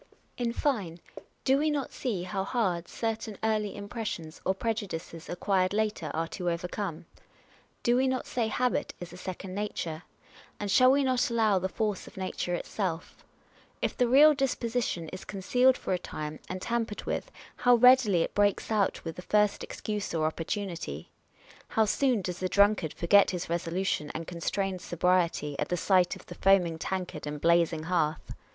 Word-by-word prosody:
In 240 -1 -1
fine, 210 - -1 0.4
do 265 +1 +3
we 310 +1 +2
not 290 -3 -2
see 215 -9 -2
how 190 +1 -2
hard 190 -6 -1
certain 220 -2 -3
early 215 -2 0
impres 215 +2 -5
sions, 160 -4 -6
or 190 - +1
prejudices 195 -7 -4
acquired 185 +1 +1
later, 210 -7 -1
are 165 +1 -1
to 180 -3 -2
overcome? 175 0 -4 0.8
Do 240 - +3
we 265 +1 +3
not 260 -1 -1
say 235 -3 -1
habit 250 +3 0
is 175 -1 -8
a - - -9
second 185 +1 -6
nature? 180 -6 -3 0.6
And 205 -1 -2
shall 255 +4 +6
we 280 +1 +3
not 255 -2 +2
allow 220 -4 +3
the 190 +1 -2
force 210 -1 -2
of - - -14
nature 185 -1 -2
itself? 175 -2 -4 0.6
If - - -1
the 245 - +2
real 290 +5 +7
disposition 245 - -1
is 185 - -8
concealed 250 +7 +2
for - - -2
a 180 - 0
time 155 -2 -6
and 185 0 -5
tampered 230 -3 -2
with, - - -3 0.3
how 245 0 +5
readily 240 -7 +6
it - - -5
breaks 205 +1 +1
out 205 -4 +1
with 165 - -5
the - - -5
first 210 +2 +2
excuse 210 -4 -4
or 155 -1 +1
opportunity! 165 - -4 0.6
How 220 - +2
soon 245 -1 +1
docs 180 0 -4
the 185 - -1
drunkard 200 -6 +3
forget 200 +4 +5
his 180 -2 -4
resolution 170 -2 -1
and 165 - -4
con 170 0 -8
strained 195 0 -1
sobriety, 175 -4 +1
at - - -1
sight 185 -1 +3
of - - -14
the - - -9
foaming 180 -4 +3
tankard 180 -4 -4
and 150 0 -4
blazing 170 -1 +3
hearth 160 -3 -1
195 Hz, 170 wpm, -29 LUFS, 170-225 Hz, 0.8 s, real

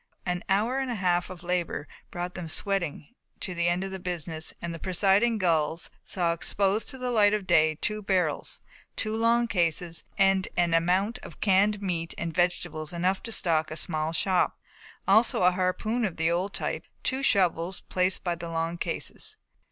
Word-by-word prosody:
An 180 -1 -1
hour 220 +7 +2
and 265 -1 -2
a 240 - -1
half 180 -3 +1
of 180 -1 -9
labour 175 -4 -2 0.2
brought 175 +1 -4
them 175 -3 -6
sweating 175 0 -1 0.3
to 185 - -4
the 170 0 0
end 175 +2 +1
of 195 - -4
the 190 - -5
business 165 -3 -3
and 170 0 -4
the 165 - -7
presiding 195 +6 +2
gulls 165 -3 0
saw 170 -3 +1
exposed 200 +5 +1
to 265 - -1
the 250 -1 -2
light 210 -3 +4
of 205 -2 -4
day 155 -3 +4
two 210 +7 -2
big 195 - -19
barrels, 180 -6 0 0.3
two 215 0 -1
long 235 +1 +3
cases 170 -3 0
and 195 -1 +3
an 175 -1 +2
amount 185 +8 +2
of - - -12
canned 205 +1 +3
meat 165 -3 -2
and 165 -1 -3
vegetables 175 -3 -1
enough 185 +3 0
to 230 - -6
stock 160 -7 +1
a 155 - -5
small 155 -1 0
shop, 180 +2 +1 0.5
also 210 -1 +4
a 180 - +6
harpoon 185 +6 -1
of 195 -6 -2
the 165 +1 +2
old 180 +4 0
type - - -3
and - - -37
two 265 0 0
shovels 185 -7 +2
placed 185 0 0
by 175 - 0
the 170 0 -6
long 165 +1 -2
cases. 430 - -2
180 Hz, 190 wpm, -27 LUFS, 170-200 Hz, 0.5 s, a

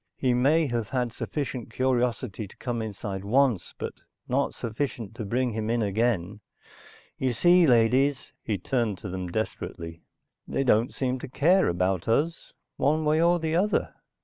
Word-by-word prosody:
"He 130 -2 +1
may 145 +7 +3
have 120 -5 -2
had 125 -3 -1
sufficient 135 -5 -4
curiosity 125 -4 -1
to - - -18
come 120 -2 -3
inside 100 -2 -5
once, 120 -3 +1
but - - -4 0.3
not - - 0
sufficient 115 -2 -4
to 110 -1 -6
bring 125 +4 0
him 110 0 -2
in 115 -1 +1
again. 105 -2 0 0.8
You 130 -2 +1
see, 175 +7 +5
ladies," 130 +3 +3
he 105 -3 -2
turned 115 0 -1
to 105 - -7
them 90 0 -4
desperately. 85 -5 -4 0.5
"They 135 - 0
don't 115 -2 +3
seem 130 -1 -2
to - - -7
care 175 +9 +3
about 90 +1 0
us, 155 +9 0 0.3
one 155 +2 +1
way 155 +1 +3
or 175 +1 +4
the 160 -1 -1
other." 200 +5 +1
120 Hz, 160 wpm, -27 LUFS, 105-140 Hz, 0.8 s, see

